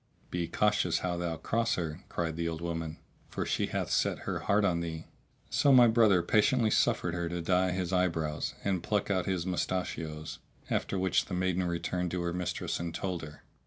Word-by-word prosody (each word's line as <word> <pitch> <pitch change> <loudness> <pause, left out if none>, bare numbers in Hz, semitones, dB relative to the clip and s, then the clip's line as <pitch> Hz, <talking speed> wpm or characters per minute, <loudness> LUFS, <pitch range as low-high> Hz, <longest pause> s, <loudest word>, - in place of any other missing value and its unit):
"Be 85 -1 -1
cautious 105 +4 +1
how 90 -1 0
thou 85 -2 -2
cross 115 +5 0
her," 80 -2 -3
cried 80 -2 -2
the 85 0 -2
old 80 -1 -4
woman; 80 -2 -4 0.3
"for - - -3
she - - 0
hath - - -2
set - - +1
her - - -2
heart 100 +1 +2
on 85 -3 +2
thee." 80 -1 -5 0.5
So 140 - +4
my 125 -2 +8
brother 110 -6 +4
patiently 110 +4 +3
suffered 85 - +2
her 85 -1 -2
to 85 0 -3
dye 90 +2 +2
his 90 0 -2
eyebrows 80 -4 0
and 95 -3 0
pluck 105 +2 0
out 95 -3 0
his 95 -3 -1
mustachios, 80 -4 -3 0.3
after 100 - 0
which 95 0 +2
the 90 - -4
maiden 95 0 +1
returned 90 +1 -1
to 90 0 -2
her 85 0 -1
mistress 90 0 -2
and 85 -1 -4
told 90 -3 -2
her. 75 -1 -10
90 Hz, 195 wpm, -30 LUFS, 85-95 Hz, 0.5 s, my